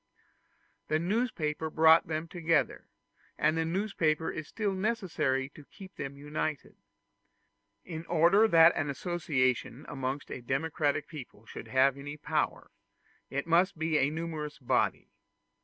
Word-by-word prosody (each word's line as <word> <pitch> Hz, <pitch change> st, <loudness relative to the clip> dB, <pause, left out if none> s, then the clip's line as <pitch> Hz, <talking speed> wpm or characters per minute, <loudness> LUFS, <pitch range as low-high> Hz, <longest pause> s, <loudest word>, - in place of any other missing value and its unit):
The 155 Hz, -, +2 dB
newspaper 170 Hz, -5 st, -1 dB
brought 160 Hz, +1 st, +5 dB
them 155 Hz, +1 st, -3 dB
together, 165 Hz, -2 st, 0 dB, 0.5 s
and 155 Hz, +1 st, +2 dB
the 165 Hz, 0 st, 0 dB
newspaper 165 Hz, -3 st, 0 dB
is 155 Hz, -1 st, -6 dB
still 210 Hz, -3 st, -2 dB
necessary 185 Hz, -, -1 dB
to 150 Hz, -, -14 dB
keep 190 Hz, +5 st, -13 dB
them 140 Hz, 0 st, -6 dB
united. 150 Hz, 0 st, -4 dB, 1.1 s
In 165 Hz, -2 st, -7 dB
order 175 Hz, +6 st, +5 dB
that 165 Hz, -3 st, +6 dB
an 145 Hz, -, -1 dB
association 140 Hz, -5 st, -1 dB
amongst 135 Hz, +1 st, -4 dB
a -, -, -5 dB
democratic 145 Hz, +3 st, -1 dB
people 130 Hz, -8 st, -10 dB
should -, -, -9 dB
have 135 Hz, +1 st, +3 dB
any 145 Hz, +2 st, -7 dB
power, -, -, -2 dB, 0.6 s
it 140 Hz, +1 st, -2 dB
must 175 Hz, +3 st, +3 dB
be 160 Hz, -1 st, +1 dB
a 135 Hz, -, +3 dB
numerous 155 Hz, -1 st, -5 dB
body. 130 Hz, -6 st, 0 dB
155 Hz, 130 wpm, -30 LUFS, 145-170 Hz, 1.1 s, that